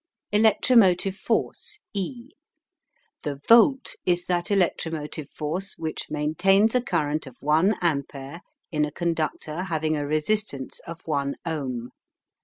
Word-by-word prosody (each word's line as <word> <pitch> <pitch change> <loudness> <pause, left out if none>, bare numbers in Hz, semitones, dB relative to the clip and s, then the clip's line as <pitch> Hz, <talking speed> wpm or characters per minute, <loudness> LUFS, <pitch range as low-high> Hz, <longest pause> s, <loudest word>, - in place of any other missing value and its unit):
ELECTROMOTIVE 210 -3 +4
FORCE 415 - -2 0.2
E. 235 +6 -4 0.9
The 145 -3 -4
Volt 255 +4 +5
is 175 -1 +1
that 175 -1 0
electromotive 160 -6 -1
force 170 +6 -3
which 160 -1 -4
maintains 175 +8 +3
a 250 - +3
current 155 - -1
of 125 - -12
one 160 +8 +3
ampere 140 0 -2 0.3
in 150 -2 +1
a 150 - -1
conductor 160 0 -2
having 155 -3 0
a 145 -1 -2
resistance 155 -2 -1
of 165 0 -9
one 140 -3 -1
ohm. 130 -7 -3
165 Hz, 120 wpm, -25 LUFS, 150-195 Hz, 0.9 s, Volt